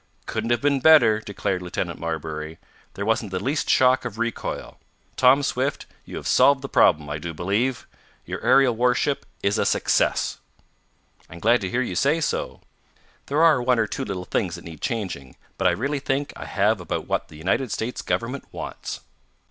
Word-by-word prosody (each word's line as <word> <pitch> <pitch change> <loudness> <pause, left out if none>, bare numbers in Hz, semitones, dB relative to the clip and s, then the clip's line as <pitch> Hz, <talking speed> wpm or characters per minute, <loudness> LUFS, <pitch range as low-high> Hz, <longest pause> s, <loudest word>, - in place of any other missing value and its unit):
"Couldn't 110 +1 -3
have 120 -1 +1
been 140 -1 +3
better," 125 -8 +6
declared 100 -3 -3
Lieutenant 90 -1 -4
Marbury. 80 -1 -4 0.4
"There 100 - -3
wasn't 110 -1 0
the 95 -1 -3
least 145 +8 -1
shock 130 0 +4
of 110 - -6
recoil. 115 0 -4 0.4
Tom 130 +2 +5
Swift, 135 +1 -1 0.2
you - - -9
have - - -6
solved 140 -1 +4
the - - -3
problem, 75 - +3
I 75 +1 -4
do 85 +1 -6
believe! 110 +9 -1 0.4
Your - - -5
aerial 135 -4 +5
warship 125 +4 +1 0.2
is 100 +1 +1
a - - +3
success!" - - +1 0.9
"I'm 85 - -10
glad 115 +6 +3
to 95 - -3
hear 120 +4 0
you 105 - -4
say 140 - +2
so. 155 - -2 0.7
There 150 +4 +2
are 155 -6 +5
one 125 0 +2
or 115 - +2
two - - -4
little 95 -3 -5
things - - -1
that - - -11
need 80 -3 -10
changing, 95 - -4 0.2
but - - +3
I - - +6
really 140 +11 -1
think 140 +1 -2
I - - -8
have 105 0 +1
about 85 - -4
what - - -1
the 75 - -13
United 100 - -1
States 115 +4 -3
Government 125 +4 -3
wants." - - -6
115 Hz, 185 wpm, -24 LUFS, 90-130 Hz, 0.9 s, better